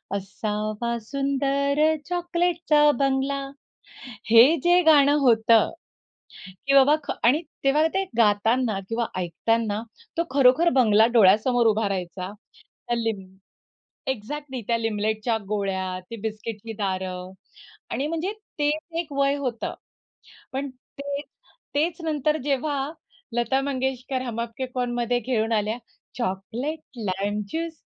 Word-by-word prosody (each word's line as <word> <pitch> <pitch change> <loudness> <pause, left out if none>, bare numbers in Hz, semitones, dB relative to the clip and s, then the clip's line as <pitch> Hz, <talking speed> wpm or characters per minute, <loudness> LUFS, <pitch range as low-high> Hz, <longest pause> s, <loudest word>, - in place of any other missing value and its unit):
असावा 215 +4 -3
सुंदर 275 +3 0 0.3
चॉकलेटचा 345 -3 +2
बंगला. 275 0 0 0.8
हे 240 +8 +8
जे 350 +1 +5
गाणं 290 -2 +6
होतं 230 -3 +4 1.0
की 275 - +3
बाबा 275 +2 +7
ख - - -3
आणि 270 +8 +4 0.2
तेव्हा 300 +4 +4
ते 385 0 +1
गातांना 225 0 +2
किंवा 230 +1 0
ऐकतांना 215 +5 0 0.4
तो 335 - +2
खरोखर 275 +5 +5
बंगला 220 -3 +5
डोळ्यासमोर 230 +3 +5
उभा 215 -1 +2
राहायचा. 185 0 -4 0.6
हल्ली 230 -1 +1 1.0
एक्झॅक्टली 265 +3 -6
त्या 235 - +3
लिमलेटच्या 220 +1 -1
गोळ्या, 190 -3 -2
ती 230 - -5
बिस्किटची 220 0 -5
दारं 185 -2 -3 0.6
आणि 280 - -1
म्हणजे 330 +5 -2 0.3
तेच 310 +3 -1
एक 310 -4 -7
वय 275 0 +2
होतं. 250 -5 -3 0.8
पण 275 +1 -2 0.3
तेच, 285 +1 -4 0.5
तेच 330 +4 0
नंतर 305 0 +1
जेव्हा 280 0 -1 0.4
लता 240 +3 +1
मंगेशकर 265 -1 -2
हम 230 -2 -4
आपके 235 +2 -4
है 255 - -4
कोण? 245 -1 -1
मध्ये 240 0 0
घेवून 225 -2 -1
आल्या 215 +2 0 0.4
चॉकलेट, 240 +8 -3 0.2
लाईम 205 0 -2
ज्यूस, 330 0 -3
245 Hz, 115 wpm, -25 LUFS, 215-285 Hz, 1.0 s, हे